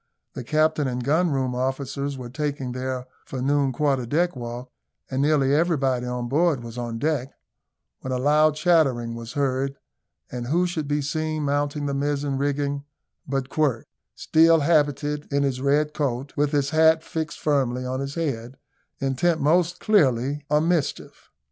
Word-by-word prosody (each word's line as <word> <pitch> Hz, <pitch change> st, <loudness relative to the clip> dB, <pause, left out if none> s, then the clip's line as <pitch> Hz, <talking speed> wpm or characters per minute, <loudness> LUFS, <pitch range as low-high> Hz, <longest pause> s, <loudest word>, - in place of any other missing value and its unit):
The -, -, -6 dB
captain 155 Hz, +2 st, +1 dB
and 125 Hz, -1 st, -3 dB
gun 160 Hz, +7 st, +2 dB
room 130 Hz, -3 st, -1 dB
officers 135 Hz, +2 st, -2 dB
were 125 Hz, -2 st, -8 dB
taking 145 Hz, -2 st, -3 dB
their 130 Hz, 0 st, -4 dB, 0.2 s
for 130 Hz, -, -6 dB
noon 140 Hz, +1 st, +1 dB
quarter 135 Hz, -2 st, 0 dB
deck 175 Hz, +6 st, +1 dB
walk, 120 Hz, +1 st, -7 dB, 0.4 s
and 130 Hz, +1 st, 0 dB
nearly 140 Hz, -2 st, +3 dB
everybody 135 Hz, -6 st, +1 dB
on 125 Hz, -1 st, -3 dB
board 150 Hz, -1 st, +1 dB
was 115 Hz, -1 st, -8 dB
on 120 Hz, -2 st, -4 dB
deck, 140 Hz, -1 st, -1 dB, 0.7 s
when 130 Hz, -, -6 dB
a 130 Hz, -, 0 dB
loud 150 Hz, +3 st, +3 dB
chattering 145 Hz, -8 st, +2 dB
was 115 Hz, 0 st, -7 dB
heard, 135 Hz, -1 st, 0 dB, 0.6 s
and 120 Hz, -1 st, -5 dB
who 170 Hz, +6 st, +2 dB
should 165 Hz, -4 st, -3 dB
be 145 Hz, 0 st, 0 dB
seen 155 Hz, +1 st, -2 dB
mounting 145 Hz, +1 st, -1 dB
the 140 Hz, -, -1 dB
mizen 140 Hz, -1 st, -1 dB
rigging 140 Hz, 0 st, -1 dB, 0.4 s
but 135 Hz, -1 st, -2 dB
Quirk, 140 Hz, -7 st, 0 dB, 0.3 s
still 165 Hz, 0 st, +4 dB
habited 145 Hz, -1 st, +1 dB
in 140 Hz, 0 st, +2 dB
his 130 Hz, -2 st, -1 dB
red 150 Hz, +2 st, +2 dB
coat, 135 Hz, -1 st, -2 dB
with 145 Hz, 0 st, +1 dB
his 140 Hz, -2 st, +1 dB
hat 160 Hz, 0 st, +4 dB
fixed 160 Hz, -2 st, -4 dB
firmly 130 Hz, -4 st, 0 dB
on 130 Hz, +1 st, -2 dB
his 140 Hz, 0 st, -4 dB
head, 130 Hz, -6 st, -3 dB, 0.4 s
intent, 135 Hz, +5 st, +1 dB
most 175 Hz, +4 st, +2 dB
clearly, 140 Hz, -, +2 dB
on 150 Hz, +2 st, +2 dB
mischief. 170 Hz, -5 st, -2 dB
140 Hz, 160 wpm, -24 LUFS, 130-155 Hz, 0.7 s, still